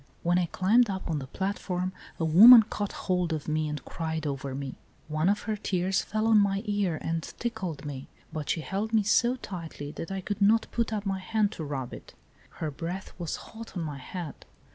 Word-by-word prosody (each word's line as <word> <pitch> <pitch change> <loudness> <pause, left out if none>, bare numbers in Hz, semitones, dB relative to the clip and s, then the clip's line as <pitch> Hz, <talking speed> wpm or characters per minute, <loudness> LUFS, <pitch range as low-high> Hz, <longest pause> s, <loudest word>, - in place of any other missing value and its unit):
When 175 +1 +3
I 175 - +1
climbed 215 +7 +3
up 190 -1 -3
on 155 - 0
the 135 - -7
platform 185 +1 -2 0.3
a 165 - +1
woman 220 +9 +10
caught 205 -2 -4
hold 180 -3 +1
of 155 -2 -4
me 155 0 0
and 150 -2 -5
cried 160 -1 -3
over 135 -2 -3
me. 135 -1 -4 0.3
One 155 +3 +1
of 205 +1 +1
her 220 - -2
tears 190 -2 0
fell 215 +1 -2
on 225 -1 +6
my 200 0 +2
ear 205 -6 0
and 165 0 -1
tickled 185 -10 -5
me; 140 -2 -6 0.3
but 155 -3 -4
she 165 - +1
held 200 +7 -3
me 215 - +4
so 235 +4 +3
tightly 165 - -7
that 165 - -6
I 195 0 -3
could 205 +2 -4
not 220 +3 +5
put 235 -1 0
up 210 -1 -2
my 195 -1 -1
hand 210 +2 +1
to 170 - -6
rub 135 -4 -4
it. - - -11 0.4
Her 155 -2 -3
breath 175 +6 -5
was 170 -2 -2
hot 225 -3 -9
on 170 - -1
my 145 -3 -5
head. 165 +2 -7
185 Hz, 210 wpm, -28 LUFS, 155-205 Hz, 0.4 s, woman